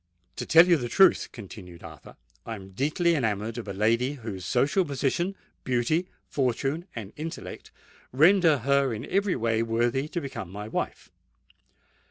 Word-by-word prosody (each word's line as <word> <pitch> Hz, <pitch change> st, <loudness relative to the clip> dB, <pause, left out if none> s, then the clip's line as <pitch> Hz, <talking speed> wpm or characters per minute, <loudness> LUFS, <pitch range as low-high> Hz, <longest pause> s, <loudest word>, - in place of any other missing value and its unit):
"To -, -, -4 dB
tell 165 Hz, +2 st, +8 dB
you 175 Hz, -2 st, +5 dB
the 120 Hz, -4 st, -4 dB
truth," 190 Hz, +5 st, +4 dB
continued 95 Hz, -6 st, -11 dB
Arthur, -, -, -12 dB, 0.3 s
"I 115 Hz, -, -5 dB
am 95 Hz, -2 st, -11 dB
deeply 155 Hz, -, +1 dB
enamoured 110 Hz, -4 st, -1 dB
of 115 Hz, -, -8 dB
a -, -, -3 dB
lady 115 Hz, +7 st, +1 dB
whose 110 Hz, -9 st, -7 dB
social 145 Hz, +10 st, +2 dB
position, 150 Hz, +6 st, -1 dB, 0.3 s
beauty, 130 Hz, +8 st, 0 dB, 0.2 s
fortune, 135 Hz, -, -1 dB
and 110 Hz, -3 st, -7 dB
intellect 160 Hz, +2 st, -7 dB, 0.4 s
render 165 Hz, +3 st, +5 dB
her 135 Hz, -1 st, +1 dB
in 110 Hz, -, -6 dB
every 200 Hz, -1 st, +1 dB
way 115 Hz, -2 st, 0 dB
worthy 120 Hz, +4 st, 0 dB
to 175 Hz, -, -3 dB
become 135 Hz, -, -6 dB
my 105 Hz, +3 st, -7 dB
wife." -, -, -4 dB
130 Hz, 155 wpm, -27 LUFS, 110-155 Hz, 0.4 s, tell